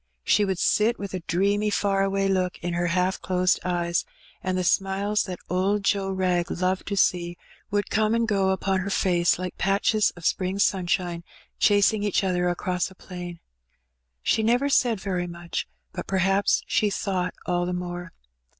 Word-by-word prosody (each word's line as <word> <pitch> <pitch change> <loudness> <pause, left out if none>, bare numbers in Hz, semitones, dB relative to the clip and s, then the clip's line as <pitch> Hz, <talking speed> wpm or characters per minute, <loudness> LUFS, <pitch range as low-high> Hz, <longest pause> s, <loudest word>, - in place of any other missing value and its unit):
She 205 - +3
would 190 -2 -1
sit 220 +6 +2
with 200 -2 -6
a 185 - -2
dreamy 200 +4 +1
Ear 195 -1 +2
away 195 0 +1
look 185 -1 0
in 175 0 -2
her 175 0 0
half 180 +2 0
closed 180 +1 +1
eyes, 175 -1 0 0.4
and 185 0 -1
the 185 - 0
smiles 195 +3 +1
that 185 -2 -5
Did 195 +3 0
Joe 195 -1 +1
Wrag 185 -2 0
loved 185 +1 -1
to 200 - -2
see 175 -2 +1 0.3
would 205 0 -1
come 215 +1 +2
and 230 0 +1
go 195 -3 +2
upon 190 0 0
her 195 +2 -3
Tace 175 -3 +2
like 185 0 -6
patches 200 +2 +2
of 175 -2 -10
spring 185 0 0
sunshine 175 -3 0 0.4
chasing 205 +1 +4
each 205 -1 +1
other 180 -2 +1
across 180 +1 -1
a 190 - -16
plain. 175 -2 -8 0.8
She - - +2
never 245 +6 +2
said 240 -6 +2
very 185 -2 -2
much, 170 0 -5 0.3
but - - -6
perhaps 195 +1 +2
she 210 - +1
thought 185 -3 -2
all 175 0 0
the - - -2
more. 175 0 -5
190 Hz, 175 wpm, -25 LUFS, 180-200 Hz, 0.8 s, chasing